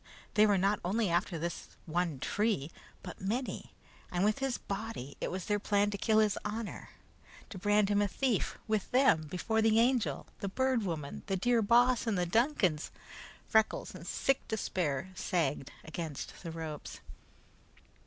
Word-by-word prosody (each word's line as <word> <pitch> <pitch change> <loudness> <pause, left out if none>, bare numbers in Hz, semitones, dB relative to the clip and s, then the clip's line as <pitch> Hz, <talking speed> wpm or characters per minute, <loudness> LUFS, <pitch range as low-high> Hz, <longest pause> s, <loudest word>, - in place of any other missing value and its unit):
They 215 0 +6
were 205 -1 +4
not 195 +2 +2
only 200 +1 +1
after 175 0 +1
this 170 +1 -5
one 170 -2 -1
tree, 205 - 0 0.3
but 180 - -8
many, 230 +7 -3 0.4
and 180 +2 +1
with 215 +4 +2
his 270 -2 0
body 195 - -5
it - - -1
was 185 -1 -4
their 210 0 +1
plan 205 0 +2
to 200 - -3
kill 220 -1 +3
his 215 -2 +3
honor. 215 +1 -5 0.6
To 195 - -6
brand 205 +1 +3
him 205 0 +3
a 205 - +2
thief, 235 +2 0
with 215 -3 0
them, 250 - +4
before 220 +6 0
the 220 0 +4
Angel, 245 0 +2
the 200 - -3
Bird 260 +3 +1
Woman, 160 -7 -4
the 195 -1 0
dear 240 +4 +3
Boss, 240 +3 +4
and 215 -4 +1
the 180 - +1
Duncans 185 - +2 0.6
Freckles, 220 0 +2
in 180 -3 -9
sick 270 +8 0
despair, 185 -7 -1
sagged 150 -7 -1
against 160 -3 -6
the 170 - -6
ropes. 160 -2 -6
205 Hz, 165 wpm, -32 LUFS, 175-220 Hz, 0.6 s, They